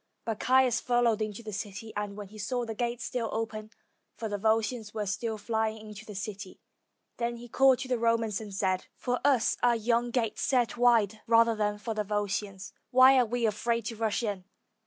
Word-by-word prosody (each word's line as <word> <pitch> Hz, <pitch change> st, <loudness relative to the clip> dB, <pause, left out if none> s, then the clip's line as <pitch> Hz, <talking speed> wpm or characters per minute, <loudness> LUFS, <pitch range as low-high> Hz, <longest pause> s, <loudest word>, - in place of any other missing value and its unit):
But 225 Hz, -2 st, -3 dB
Caius 255 Hz, -1 st, +3 dB
followed 240 Hz, -3 st, +2 dB
into 215 Hz, +1 st, -4 dB
the 215 Hz, -1 st, -7 dB
city, 210 Hz, +2 st, -6 dB
and 205 Hz, -1 st, -4 dB
when 205 Hz, -2 st, -7 dB
he 215 Hz, +1 st, -12 dB
saw 240 Hz, +4 st, -2 dB
the 225 Hz, -, -4 dB
gates 235 Hz, +1 st, -3 dB
still 235 Hz, -3 st, -2 dB
open, 220 Hz, -1 st, -4 dB, 0.5 s
for 225 Hz, -, -3 dB
the 205 Hz, -1 st, -3 dB
Volscians 220 Hz, +1 st, 0 dB
were 210 Hz, -1 st, -1 dB
still 220 Hz, +3 st, -2 dB
flying 220 Hz, 0 st, -1 dB
into 210 Hz, +1 st, -10 dB
the 210 Hz, -, -8 dB
city, 200 Hz, -1 st, -6 dB, 0.6 s
then 235 Hz, 0 st, -2 dB
he 240 Hz, +1 st, -10 dB
called 265 Hz, +2 st, +4 dB
to 260 Hz, -, -4 dB
the 250 Hz, -2 st, 0 dB
Romans, 230 Hz, -2 st, +1 dB
and 210 Hz, -2 st, -8 dB
said, 190 Hz, -1 st, -1 dB
"For 245 Hz, -1 st, -2 dB
us 265 Hz, -5 st, +3 dB
are 240 Hz, -1 st, +4 dB
yon 235 Hz, +2 st, +1 dB
gates 235 Hz, -3 st, -1 dB
set 250 Hz, -3 st, +1 dB
wide 225 Hz, -3 st, +3 dB
rather 230 Hz, 0 st, +5 dB
than 210 Hz, -1 st, 0 dB
for 215 Hz, +2 st, -4 dB
the 215 Hz, -1 st, -1 dB
Volscians; 205 Hz, -1 st, -3 dB, 0.2 s
why 260 Hz, +1 st, +7 dB
are 245 Hz, -, +3 dB
we 240 Hz, +1 st, 0 dB
afraid 230 Hz, +1 st, 0 dB
to 230 Hz, -, -4 dB
rush 220 Hz, +1 st, -1 dB
in?" 200 Hz, -4 st, -3 dB
225 Hz, 200 wpm, -29 LUFS, 210-240 Hz, 0.6 s, why